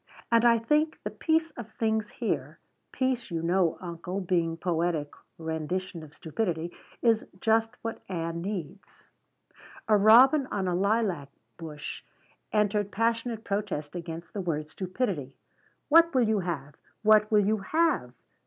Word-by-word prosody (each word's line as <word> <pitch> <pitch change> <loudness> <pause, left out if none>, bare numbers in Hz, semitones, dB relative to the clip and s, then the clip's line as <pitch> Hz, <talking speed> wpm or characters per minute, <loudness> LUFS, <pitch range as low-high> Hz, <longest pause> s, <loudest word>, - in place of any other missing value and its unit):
and 230 0 +5
I 235 -1 +6
think 300 +7 +1
the - - -3
peace 320 0 +1
of 240 -5 -9
things 220 -2 0
here - - -3 0.3
peace 260 -3 -1
you 165 -2 -3
know, 175 -1 +2
uncle, 180 +2 -5
being 170 -3 0
poetic 165 -3 -1 0.3
rendition 165 +2 -3
of 155 -1 -13
stupidity 170 -1 -2 0.3
is 230 -2 +4 0.2
just 225 +1 +2
what 225 0 -4
Ann 170 -2 -3
needs." 195 -1 -6 0.8
A 215 - +5
robin 255 +7 +7
on 195 -6 -2
a 180 - 0
lilac 195 -6 0 0.3
bush 150 -3 -7 0.5
entered 210 -1 +1
passionate 230 0 -1
protest 200 -8 -3
against 170 -1 -7
the 200 - -3
word 155 -4 -2
stupidity. 185 - -3 0.5
"What 330 0 +6
will 245 -3 +4
you 215 -1 +2
have? 155 -6 -4 0.3
What 215 0 +5
will 210 -2 +4
you 215 +2 +2
have?" 310 - +1
195 Hz, 140 wpm, -28 LUFS, 165-225 Hz, 0.8 s, robin